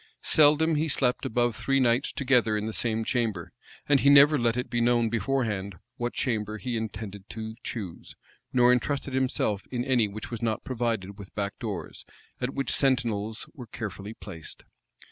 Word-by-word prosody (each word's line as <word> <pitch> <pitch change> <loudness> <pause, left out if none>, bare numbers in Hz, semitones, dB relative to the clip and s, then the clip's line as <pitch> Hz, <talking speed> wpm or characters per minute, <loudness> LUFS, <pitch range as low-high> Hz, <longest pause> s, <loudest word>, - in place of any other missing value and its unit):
Seldom 155 +1 +5
he 155 +2 +1
slept 130 -4 0
above 120 0 +1
three 135 +3 +1
nights 125 +1 +2
together 125 -5 +2
in 105 - -2
the 110 - -3
same 115 -1 0
chamber; 115 -3 -1 0.3
and 145 -1 +5
he 140 - +4
never 145 +1 +7
let 120 0 +1
it 125 - -2
be 120 -1 -1
known 120 -1 +3
beforehand 110 -5 -1 0.2
what 120 0 -2
chamber 110 -4 -1
he 125 +2 -4
intended 105 -3 -6
to 110 0 -6
choose, 100 -8 -6 0.4
nor 125 0 +5
intrusted 135 +2 -1
himself 125 -6 0
in 125 -1 -2
any 125 -5 +3
which 105 +3 -8
was 115 - -5
not 115 -1 -1
provided 115 -7 -2
with 100 - -11
back 100 -1 -3
doors, 105 -7 -5 0.4
at 130 +2 -3
which 135 - 0
sentinels 115 -6 0
were 125 -7 -10
carefully 105 -1 -6
placed. 85 -6 -9
120 Hz, 170 wpm, -27 LUFS, 110-130 Hz, 0.4 s, never